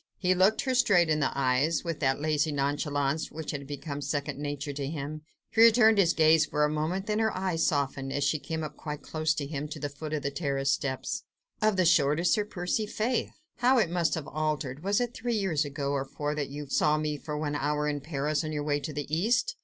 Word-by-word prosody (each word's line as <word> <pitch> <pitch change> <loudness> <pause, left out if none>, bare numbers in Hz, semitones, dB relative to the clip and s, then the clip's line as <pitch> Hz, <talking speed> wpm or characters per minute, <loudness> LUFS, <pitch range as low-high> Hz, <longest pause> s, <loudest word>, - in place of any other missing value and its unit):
He 185 -1 +2
looked 190 +4 +3
her 260 -2 -1
straight 200 -10 +4
in 155 - +2
the 150 - +2
eyes, 135 +4 +2
with 165 -3 -3
that 135 -2 +1
lazy 155 0 +1
nonchalance 145 +1 -1
which 160 -1 -5
had 140 -2 -6
become 145 0 -5
second 145 -1 -3
nature 145 0 -4
to 140 -1 -3
him. 150 0 -5 0.3
She 225 - +3
returned 225 -2 +7
his 170 -4 +4
gaze 160 0 +5
for 150 -1 +1
a 150 - -1
moment, 160 +6 -1
then 210 0 0
her 220 -1 +2
eyes 185 -3 0
softened, 135 -2 -1
as 145 - -1
she 145 +2 +1
came 160 +1 -4
up 150 -1 -6
quite 150 -2 -6
close 155 0 0
to 145 - -3
him, 145 0 -4
to 150 - -7
the 145 - -3
foot 150 +2 -7
of 150 - -2
the 140 - -1
terrace 140 -2 0
steps. 130 -2 -2 0.4
"Of 215 -2 +2
the 185 - +3
shortest, 160 +1 +3
Sir 210 - +1
Percy? 205 +2 -2
Faith! 230 +4 -1 0.2
how 250 +2 +4
it 200 -8 +2
must 175 -2 +1
have 160 -3 -5
altered! 150 -2 -2
Was 200 +1 +2
it 245 -1 -1
three 240 -1 -2
years 180 -8 +1
ago 140 0 -3
or 140 -1 0
four 145 +2 -3
that 150 -2 -3
you 145 +1 -6
saw 150 +2 +2
me 150 -1 -1
for 150 0 -5
one 150 -1 -2
hour 150 +1 0
in 145 -1 -2
Paris, 150 +1 -1
on 155 - -4
your 150 -1 -2
way 145 -1 0
to 145 +2 -5
the 145 0 -3
East? 240 - +1
155 Hz, 235 wpm, -28 LUFS, 145-175 Hz, 0.4 s, returned